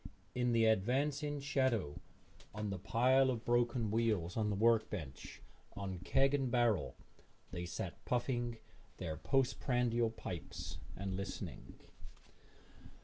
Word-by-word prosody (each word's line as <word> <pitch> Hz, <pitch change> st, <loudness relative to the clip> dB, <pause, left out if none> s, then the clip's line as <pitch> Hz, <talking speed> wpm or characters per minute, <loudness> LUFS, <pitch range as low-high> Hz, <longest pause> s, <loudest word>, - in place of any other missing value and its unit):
In 125 Hz, -1 st, +1 dB
the 115 Hz, -1 st, +4 dB
advancing 140 Hz, +8 st, +1 dB
shadow, 130 Hz, -, 0 dB, 0.6 s
on 105 Hz, -1 st, -2 dB
the 95 Hz, -, -3 dB
pile 130 Hz, +6 st, +4 dB
of 120 Hz, -3 st, -2 dB
broken 120 Hz, -2 st, +2 dB
wheels 105 Hz, -6 st, +1 dB
on 110 Hz, -2 st, +1 dB
the 105 Hz, -, 0 dB
work 115 Hz, +2 st, +4 dB
bench, 75 Hz, -10 st, -7 dB, 0.3 s
on 95 Hz, -3 st, -4 dB
keg 135 Hz, +9 st, +3 dB
and 135 Hz, -3 st, +1 dB
barrel, 120 Hz, -5 st, +2 dB, 0.6 s
they 90 Hz, -1 st, -4 dB
sat 85 Hz, 0 st, -5 dB
puffing 120 Hz, -1 st, -1 dB, 0.4 s
their 80 Hz, -, -3 dB
post 135 Hz, -, +1 dB
prandial 120 Hz, -3 st, +2 dB
pipes 90 Hz, -7 st, -6 dB, 0.2 s
and 95 Hz, -1 st, -3 dB
listening. 100 Hz, +1 st, -6 dB
115 Hz, 125 wpm, -36 LUFS, 100-125 Hz, 0.6 s, the